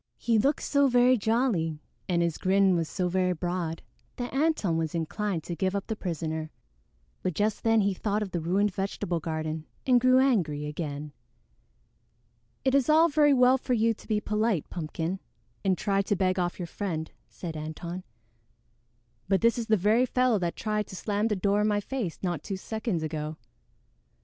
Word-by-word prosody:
He 230 -2 +2
looked 280 +7 +1
so 280 -1 +3
very 250 0 +5
jolly 220 - 0 0.3
and 170 -1 +2
his 170 -2 -1
grin 190 0 +3
was 165 -2 -1
so 180 -2 -1
very 180 0 +1
broad 175 -1 -3 0.3
that 245 0 -5
Antone 275 - +1
was 160 0 -1
inclined 170 +1 -2
to 175 - -5
give 190 +2 -1
up 200 - -2
the 220 - -3
prisoner; 160 -4 -3 0.7
but 180 - -2
just 210 +4 0
then 225 -1 +4
he 200 0 +1
thought 210 +2 -1
of 195 - -7
the 175 - -1
ruined 190 +5 +1
vegetable 185 -3 -2
garden 155 0 -4 0.2
and 250 -2 +4
grew 255 +1 +5
angry 180 - +2
again. 150 -1 -5 1.5
"It 265 - +3
is 275 -1 +3
all 320 +2 +6
very 295 -1 +4
well 255 +1 +5
for 250 - -1
you 230 -1 +3
to - - -17
be 215 -2 +1
polite, 210 -5 0
Pumpkin, 165 +2 -3 0.4
and 190 -2 +2
try 195 -1 +1
to 200 +1 0
beg 185 0 +1
off 175 -1 -1
your 180 - -4
friend," 165 -3 -4 0.2
said 165 -3 -7
Antone, 165 +4 -6 1.2
"but 195 0 +2
this 230 0 +4
is 230 - -4
the 220 -1 +4
very 220 +7 +3
fellow 250 -3 +2
that 175 -2 -2
tried 210 -1 -2
to - - -9
slam 205 +3 0
the 215 - 0
door 200 +2 +1
in 210 - +2
my 205 -1 +2
face 205 -5 -4
not 175 -5 -1
two 195 +2 -4
seconds 215 -4 -3
ago." 155 0 -4
195 Hz, 185 wpm, -28 LUFS, 170-225 Hz, 1.5 s, all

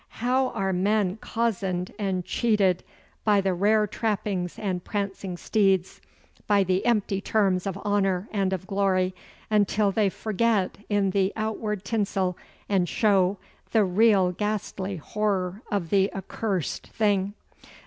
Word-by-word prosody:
How 255 +3 +2
are 195 -5 -1
men 200 +1 +1
cozened 195 -6 -2
and 190 -3 -1
cheated 205 -6 +2 0.4
by 210 -2 +4
the 190 -1 +1
rare 210 +4 +3
trappings 200 -4 -2
and 185 -4 -2
prancing 195 -3 -3
steeds, 195 -2 +1 0.5
by 205 -2 +4
the 185 0 0
empty 205 -4 +1
terms 195 -3 +1
of 195 -1 -3
honour 195 -1 +1
and 195 -3 0
of 190 -1 -3
glory, 190 -2 +1 0.4
until 210 -1 +3
they 205 0 +2
forget 215 -1 0
in 200 -2 +2
the 195 0 +1
outward 215 -2 -3
tinsel 195 -4 0 0.3
and 185 -4 +1
show 200 -3 +2 0.4
the 220 -2 +5
real 190 -1 +4
ghastly 200 -1 -3
horror 195 +2 -2
of 190 -6 -1
the 195 0 +3
accursed 195 -2 -3
thing! 205 -2 0
195 Hz, 130 wpm, -26 LUFS, 185-210 Hz, 0.5 s, the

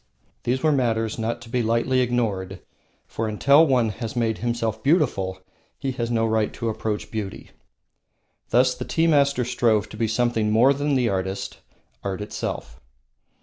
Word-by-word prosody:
These 130 +3 0
were 155 - +4
matters 115 -5 0
not 115 +1 -2
to 115 - -13
be 125 +1 0
lightly 115 +3 +1
ignored, 110 -7 -1 0.5
for 115 - -3
until 140 +9 +5
one 125 -5 +2
has 115 +2 -6
made 115 -2 0
himself 115 -2 -2
beautiful 125 - +1 0.4
he 135 - -2
has 120 -2 -3
no 115 -1 +1
right 110 -1 +1
to 115 - -3
approach 110 -1 -3
beauty. 105 -3 -5 1.0
Thus 125 +2 +4
the - - -6
tea 165 - 0
master 140 -5 +3
strove 115 -4 +1
to 110 - -10
be 115 0 +1
something 115 -1 +1
more 120 +6 +5
than 145 +1 0
the 125 -2 +2
artist, 95 0 -3 0.4
art 95 -2 -3
itself. 105 - -5
115 Hz, 160 wpm, -24 LUFS, 110-130 Hz, 1.0 s, until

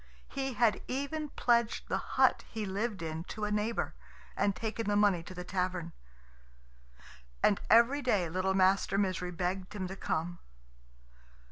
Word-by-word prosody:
He 270 -1 -3
had 225 -3 +2
even 285 +4 -3
pledged 235 -4 +1
the - - 0
hut - - +2
he 220 -2 -4
lived 200 0 -2
in 160 0 -4
to 210 +1 -4
a 210 - -2
neighbour, 210 +2 -1 0.4
and 200 -1 +1
taken 225 0 -3
the 205 - +2
money 205 -4 +4
to 185 +3 -10
the 180 - -5
tavern. 180 -2 -2 1.5
And 205 - +4
every 235 +6 +6
day 205 -10 +2
little 185 +3 0
Master 195 +1 +3
Misery 185 -3 0
begged 185 +3 -3
him 190 -3 -3
to 190 - -6
come. 175 -1 -2
200 Hz, 150 wpm, -32 LUFS, 185-230 Hz, 1.5 s, every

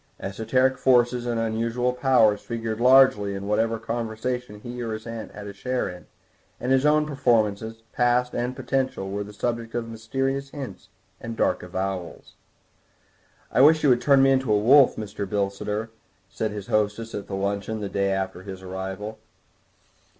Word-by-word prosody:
Esoteric 125 +6 0
forces 120 -1 +3
and 120 -1 -1
unusual 115 +2 0
powers 125 -5 +3
figured 115 -1 -4
largely 125 -6 +5
in 100 0 -5
whatever 115 +2 +1
conversation 115 0 -4
he 120 +2 -7
or 115 -2 -3
his 110 +1 -7
aunt 115 -1 -6
had 105 0 -8
a 100 - -7
share 125 +5 -2
in, 90 -1 -9 0.5
and 125 - -2
his 135 +2 +4
own 150 0 +4
performances, 115 -6 0
past 125 0 +2
and 125 +1 -2
potential, 130 -6 -2
were 100 +1 -2
the 105 - -10
subject 115 +2 -3
of 120 -1 -2
mysterious 135 +5 -2
hints 135 -12 -8 0.3
and 115 0 -7
dark - - +1
avowals. 95 -2 -5 1.2
"I - - +4
wish 155 +3 +6
you 145 - +5
would 120 -1 +4
turn 140 -2 +5
me 135 - +5
into 130 -3 +1
a 105 - +5
wolf, 130 +6 +6
Mr. 100 -2 -5
Bilsiter," 105 +2 -2 0.4
said 110 - -2
his 105 -2 -6
hostess 105 +2 -1
at 100 - -6
luncheon 100 +2 -2
the 105 - -3
day 100 0 0
after 95 -1 -2
his 95 -1 -9
arrival. 95 +3 -6
115 Hz, 165 wpm, -25 LUFS, 105-125 Hz, 1.2 s, wish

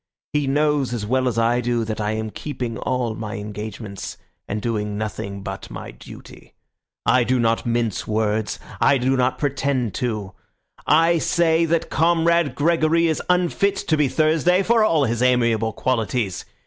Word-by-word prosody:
He 150 -2 +1
knows 145 -2 +1
as 105 -3 -4
well 130 +3 +1
as 120 - -1
I 115 +2 +2
do 120 -1 0
that 110 0 -4
I 105 +1 -1
am 110 0 -3
keeping 125 -6 -5
all 125 -3 -1
my 110 0 -6
engagements 105 0 -7 0.3
and 105 - -2
doing 105 -2 -2
nothing 100 -2 -5
but 95 0 -6
my - - -8
duty. - - -14 0.5
I 120 +3 +4
do 130 +1 +1
not 115 0 +1
mince 115 -3 -1
words. 110 0 0 0.2
I 140 - +4
do 130 +1 +1
not 125 0 +1
pretend 135 -5 -1
to. 105 -6 -3 0.5
I 165 +2 +4
say 165 0 +2
that 165 0 -1
Comrade 170 -3 +2
Gregory 165 +2 +2
is 160 -2 0
unfit 180 +3 +2
to 195 -5 0
be 150 -2 +2
Thursday 160 +6 +2
for 225 +1 +3
all 165 -8 +3
his 120 -1 -1
amiable 115 -3 +2
qualities. 115 -4 -1
125 Hz, 160 wpm, -22 LUFS, 110-155 Hz, 0.5 s, I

